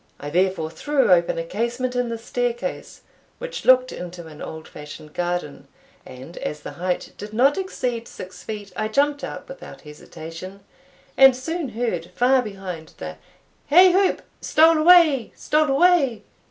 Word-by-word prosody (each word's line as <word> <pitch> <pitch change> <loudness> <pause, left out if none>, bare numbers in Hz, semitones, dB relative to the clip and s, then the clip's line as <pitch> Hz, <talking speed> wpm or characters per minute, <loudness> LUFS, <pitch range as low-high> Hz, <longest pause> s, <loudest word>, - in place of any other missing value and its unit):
I 145 - -6
therefore 180 -2 0
threw 285 - +1
open 175 -2 +3
a 165 - -2
casement 240 +7 -3
in 245 -1 0
the 230 - -3
staircase, 245 +2 -4 0.4
which - - -7
looked 255 0 +5
into 175 -1 -8
an 155 -1 -12
old 160 0 -8
fashioned 150 0 -11
garden, 175 -4 -3 0.4
and 130 +6 -11
as 150 0 -5
the - - -7
height 180 +1 -3
did 210 +1 -8
not 265 +6 +4
exceed 250 -12 -3
six 185 - -10
feet, 205 -2 -7
I 215 - -1
jumped 285 +5 +1
out - - -7
without - - -11
hesitation, 165 +5 -10 0.6
and 270 -1 +8
soon 320 +3 -4
heard 210 -8 -3
far 255 +2 +4
behind 190 -7 -8
the 80 0 -7 0.5
"hey 360 +4 +7
whoop! 385 0 +2 0.2
stole 320 +1 +4
away! 315 -7 +5
stole 305 -1 +1
away!" 275 -5 +3
230 Hz, 155 wpm, -22 LUFS, 175-275 Hz, 0.6 s, and